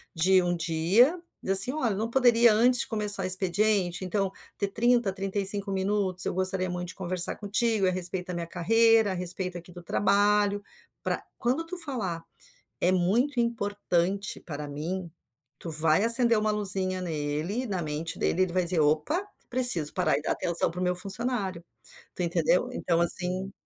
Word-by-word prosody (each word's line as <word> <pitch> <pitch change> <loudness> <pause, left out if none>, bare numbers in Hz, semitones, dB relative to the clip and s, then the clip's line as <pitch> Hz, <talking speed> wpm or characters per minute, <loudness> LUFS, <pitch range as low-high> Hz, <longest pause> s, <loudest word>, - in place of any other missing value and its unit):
de 185 +3 +3
um 175 0 -2
dia, 175 - +1 0.2
dizer 195 - -2
assim: 195 +8 +8
"Olha, 250 -9 -2
não 220 +3 -4
poderia 235 -3 +3
antes 245 +3 +3
começar 210 -3 +1
expediente, 185 0 +1
então, 195 0 -2 0.3
ter 200 - -2
30, 235 0 0
35 195 +1 -3
minutos? 190 -1 +1
Eu - - -2
gostaria 185 0 +2
muito 180 0 -6
de - - -9
conversar 180 -2 +1
contigo, 215 0 -1
a 185 - +1
respeito 180 0 -2
da 180 - -6
minha 170 -1 -5
carreira, 225 +4 +2
a - - -3
respeito, 180 0 -3
aqui, 175 0 -13
do 175 - -12
trabalho.". 205 +2 0 0.4
Pra - - -3 0.2
quando 265 +8 -2
tu 365 +2 -7
falar, 215 - -5 0.6
"é 180 +2 +2
muito 235 +9 0
importante 200 -4 -2
para 150 -2 -8
mim", 170 +5 -6 0.5
tu 165 - -8
vai 155 +3 +1
acender 235 +1 +8
uma 215 0 -1
luzinha 190 -3 +2
nele, 160 - -4
na 190 -5 -4
mente 155 +1 -6
dele, 185 - 0
ele 185 -2 -2
vai 185 0 0
dizer: 175 -1 -1
"Opa, 155 - 0 0.2
preciso 240 -12 +3
parar - - 0
e - - -9
dar - - -2
atenção 170 -1 -1
pro 180 +2 -6
meu 180 0 -1
funcionário.". 195 -2 -3 0.5
Tu - - -3
entendeu? 170 +6 0
Então, 170 -8 -2
assim 180 +3 -1
190 Hz, 165 wpm, -26 LUFS, 175-215 Hz, 0.6 s, assim